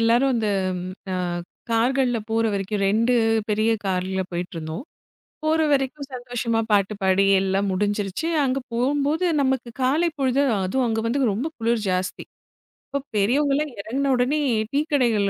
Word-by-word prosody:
எல்லாரும் 240 +4 +3
அந்த, 220 -2 0 0.6
ஆ - - -1 0.6
கார்கள்ல 245 +1 +2
போற 225 +1 +1
வரைக்கும் 200 +1 -2
2 230 +5 +2 0.4
பெரிய 215 +2 +2
கார்ல 190 0 -1
போயிட்டு 175 +1 -4
இருந்தோம். 160 - -5 0.6
போற 315 +1 +2
வரைக்கும் 275 0 0
சந்தோஷமா 245 -2 -2
பாட்டு 205 0 +3
பாடி 190 +1 +3 0.2
எல்லாம் 195 +1 0
முடிஞ்சிருச்சு. 205 - -1 0.2
அங்க 265 0 +1
போம்போது 285 +7 +1 0.2
நமக்குக் 260 -3 -1
காலை 310 +7 +2
பொழுதும் 270 0 +2
அதுவும் 255 +7 0
அங்க 225 -1 0
வந்து 270 +5 0
ரொம்ப 240 +10 -2
குளிர் 230 -1 0
ஜாஸ்தி. 185 0 -2 0.6
அப்போ 280 - -1 0.2
பெரியவங்க 275 +8 +2
எல்லாம் 295 -2 -1
இறங்கின 270 +7 -1
உடனே 255 +5 +1 0.3
டீ 285 - +3
கடைகள் 225 -7 +3
235 Hz, 140 wpm, -23 LUFS, 200-270 Hz, 0.6 s, எல்லாரும்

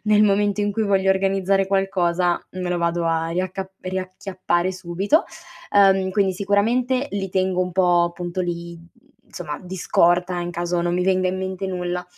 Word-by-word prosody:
nel 210 0 +4
momento 205 0 +2
in 205 0 0
cui 220 - -1
voglio 195 -2 +2
organizzare 195 0 +1
qualcosa 180 -3 +1
me 185 -1 -4
lo 180 - 0
vado 170 0 0
a 165 0 0
riacca 185 +2 -3
riacchiappare 185 -1 -2
subito. 185 - 0 0.5
Ehm, 195 -2 +4
quindi 195 -1 +1
sicuramente 235 +7 +1
li 195 -1 -2
tengo 185 0 0
un 180 0 -1
po' 175 -1 +3
appunto 175 +1 -3
lì, 170 -1 -4
mhmm, 170 0 -17 0.4
insomma 155 -5 -6
di 185 +1 -7
scorta 175 0 +2
in 175 0 -4
caso 175 0 -2
non 175 0 0
mi 180 +1 0
venga 185 -1 +2
in 185 +1 -2
mente 190 0 -4
nulla; 180 -1 -3
185 Hz, 175 wpm, -22 LUFS, 175-195 Hz, 0.5 s, nel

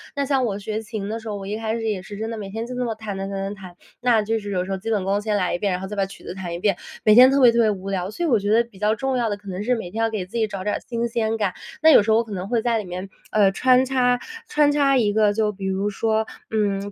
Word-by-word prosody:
那 280 - 0
像 270 -2 +1
我 205 -3 -2
学 215 +2 -4
琴 215 -2 -5
的 225 - -3
时 225 - -11
候， 210 - -3
我 195 - -7
一 210 +2 -3
开 220 0 -2
始 230 - -4
也 200 -3 -2
是 205 +2 -9
真 220 +1 -3
的 230 - -5
每 200 -2 -6
天 225 +3 -4
就 250 - -6
那 250 0 -1
么 225 -2 -2
弹 210 -3 -6
弹 195 0 -4
弹 195 -1 -3
弹 - - -10
弹。 185 -2 -12 0.3
那 240 -3 +3
就 225 +1 -1
是 205 -1 -6
有 180 -2 0
时 195 - -6
候 190 - -1
基 220 +4 -6
本 205 -4 +1
功 200 +2 0
先 215 -1 -1
来 185 -4 0
1 - - -4
遍， 200 -2 0
然 180 - -3
后 190 - -5
再 210 - -6
把 195 -1 +1
曲 195 - -13
子 - - -6
弹 180 -3 -6
1 170 - -4
遍， 195 -2 +1 0.3
每 215 - +6
天 255 +1 +9
特 275 - +3
别 245 -2 +8
特 235 - +1
别 220 - +4
无 195 0 -5
聊， 190 -1 -2
所 345 - -3
以 - - 0
我 230 -6 +4
觉 205 +1 -1
得 230 +2 +5
比 195 -5 -17
较 210 +1 +2
重 265 +2 -1
要 235 -2 0
的 205 - -1
可 205 - -18
能 185 +2 -4
是 250 +3 +2
每 200 -7 -6
天 225 +3 -3
要 225 - +2
给 210 -4 -3
自 195 +6 -7
己 220 - +2
找 195 -3 -6
点 210 - 0
儿 - - -3
新 235 -1 -1
鲜 225 -1 -1
感。 200 -4 0 0.3
那 320 - +7
有 - - +8
时 220 - +1
候 220 - +5
我 230 - +2
可 225 - -12
能 185 -1 -4
会 230 0 +1
在 235 -1 +1
里 215 - -3
面， 185 +2 -6 0.2
呃， 205 -2 +4
穿 255 +5 +4
插， 250 -2 +2 0.3
穿 295 -1 +3
插 280 -2 +3
一 210 -4 +2
个 210 -1 +3
就 215 0 +1
比 195 -1 -8
如 190 +2 0
说， 220 +2 0 0.3
嗯， 205 -2 -1
215 Hz, 360 characters per minute, -23 LUFS, 195-230 Hz, 0.3 s, 天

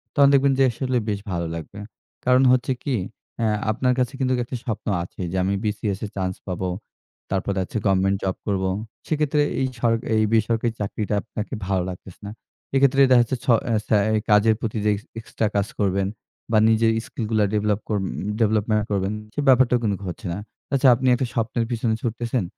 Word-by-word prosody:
তখন 140 -1 +6
দেখবেন 140 0 +4
যে - - +6
আসলে 130 +1 -1
বেশ 100 -1 -1
ভালো 85 -1 -2
লাগবে। 85 +5 -8 0.5
কারণ 130 +1 +5
হচ্ছে 130 +1 +2
কি, 140 -4 0 0.4
অ্যা 115 - +2 0.2
আপনার 125 +3 +1
কাছে 125 +1 0
কিন্তুক 130 -1 +1
একটা 125 - -6
স্বপ্ন 115 -5 -4 0.2
আছে, 90 - -9
"যে 95 - -2
আমি 95 - 0
BCS 105 -2 -2
এ - - -4
চান্স 95 -1 -2
পাবো, 90 0 -2 0.6
তারপরে 95 0 -1
হচ্ছে 95 - -5
গভমেন্ট 95 0 +2
জব 95 -1 0
করবো।" 95 -2 0 0.4
সেক্ষেত্রে 150 -1 +1 0.2
এই 130 - +2
সর 115 -1 +3 0.2
এই 110 - +3
বেসরকারি 115 +1 +2
চাকরিটা 105 +1 -2
আপনাকে 110 +2 -6
ভালো 95 -2 +1
লাগতেছে 90 0 -10
না। 100 - -6 0.4
এক্ষেত্রে 135 0 +4
দেখাচ্ছে 120 +1 +4
ছ - - -18 0.2
অ্যা 115 - +1
ছ্যা 110 - +4 0.3
কাজের 105 +1 +5
প্রতি 115 -1 -3
যে - - +4
এক্স 100 - -5 0.2
এক্সট্রা 110 -1 -2
কাজ 100 0 +1
করবেন 95 -1 +1 0.4
বা 110 - +4
নিজের 110 0 +4
স্কিলগুলা 110 -1 -1
ডেভেলপ 105 -1 +1
কর 105 - +1
উম - - -2 0.3
ডেভেলপমেন্ট 110 0 +2
করবেন, 100 0 0 0.2
সে - - -4
ব্যাপারটাও 125 -1 +5
কিন্তুক 100 -3 -1
হচ্ছে 90 - -8
না। 95 - -4 0.3
আচ্ছা, 135 0 +4
আপনি 130 +2 -1
একটা 130 - -1
স্বপ্নের 115 0 -1
পেছনে 115 -2 0
ছুটতেছেন, 120 -1 -1
110 Hz, 185 wpm, -23 LUFS, 100-125 Hz, 0.6 s, তখন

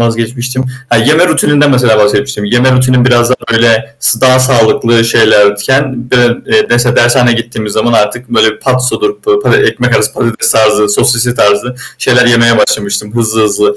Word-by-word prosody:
vazgeçmiştim. 120 +3 -3 0.3
Ha, 120 - +2
yeme 155 +10 +2
rutininden 145 0 +1
mesela 125 -4 +2
bahsetmiştim. 105 +2 -1
Yeme 120 +4 +1
rutinim 125 -1 +1
biraz 120 -1 +2
daha 125 - +1 0.2
böyle, 115 +4 0
s 115 - 0
daha 130 0 +3
sağlıklı 115 -2 +1
şeylerken 115 +4 0
d 125 - +2 0.3
eee, 215 0 0
ders 120 +1 +1
dershaneye 120 0 +2
gittiğimiz 110 -2 -6
zaman 115 +2 -1
artık 115 +3 -1
böyle 110 -2 0
patsodur, 130 - -2
pa 410 -2 0
pa 415 - +1
ekmek 420 +1 0
arası - - -1
patates 115 -2 -1
tarzı, 105 -1 +1
sosisli 120 +3 0
tarzı 105 +4 0 0.2
şeyler 125 0 +1
yemeye 115 -1 +2
başlamıştım 105 +1 -2
hızlı 110 -1 -1
hızlı. 415 - -1
120 Hz, 160 wpm, -9 LUFS, 110-130 Hz, 0.3 s, daha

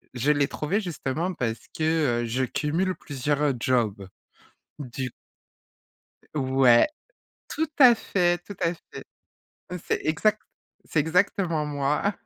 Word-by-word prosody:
je 130 +4 +2
l'ai 145 -1 +2
trouvé 185 +8 -2
justement 170 -1 -3
parce 115 -7 -4
que, 155 -7 +1
heu, - - -2
je 125 +3 -1
cumule 165 +8 -1
plusieurs 145 0 -1
jobs. 110 -6 0 0.7
Du 130 -1 -5
c - - -9 1.2
Ouais! 130 -4 +4 0.6
Tout 320 +1 -2
à 250 -4 +9
fait, 175 -5 +1
tout 205 - -8
à 170 - +1
fait. 170 - -12 0.8
C'est - - 0
exact 210 +7 +1 0.5
c'est 155 - +1
exactement 170 -1 +1
moi. 150 +7 0
150 Hz, 120 wpm, -25 LUFS, 130-175 Hz, 1.2 s, à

